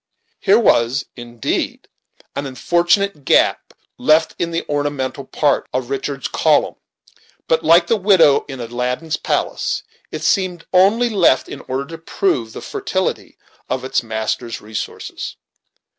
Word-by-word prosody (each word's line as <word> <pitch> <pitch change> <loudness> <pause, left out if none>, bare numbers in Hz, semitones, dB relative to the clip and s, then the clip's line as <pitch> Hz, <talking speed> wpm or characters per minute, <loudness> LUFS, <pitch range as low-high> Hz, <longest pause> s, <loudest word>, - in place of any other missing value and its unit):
Here 200 +1 +4
was, 130 - +3
indeed, 120 -2 -3 0.5
an 140 0 -3
unfortunate 175 +5 +1
gap - - +2 0.3
left 155 +1 +3
in 170 - 0
the 165 0 -3
ornamental 145 -2 -2
part 145 +1 0
of 130 0 -3
Richard's 135 0 -3
column; - - +2 0.7
but, 160 0 +2
like 165 +2 +6
the 225 - +2
window 185 -8 +5
in 135 -2 -7
Aladdin's 125 +6 -2
palace, - - -1 0.3
it - - -5
seemed 185 -4 0
only 205 +6 +4
left 185 -10 +3
in - - -8
order 135 +2 -2
to 165 +2 -9
prove 145 -9 -1
the - - -7
fertility - - -3 0.3
of 130 0 -2
its 130 - 0
master's 110 +1 -3
resources. 110 +1 -6
145 Hz, 130 wpm, -19 LUFS, 130-175 Hz, 0.7 s, like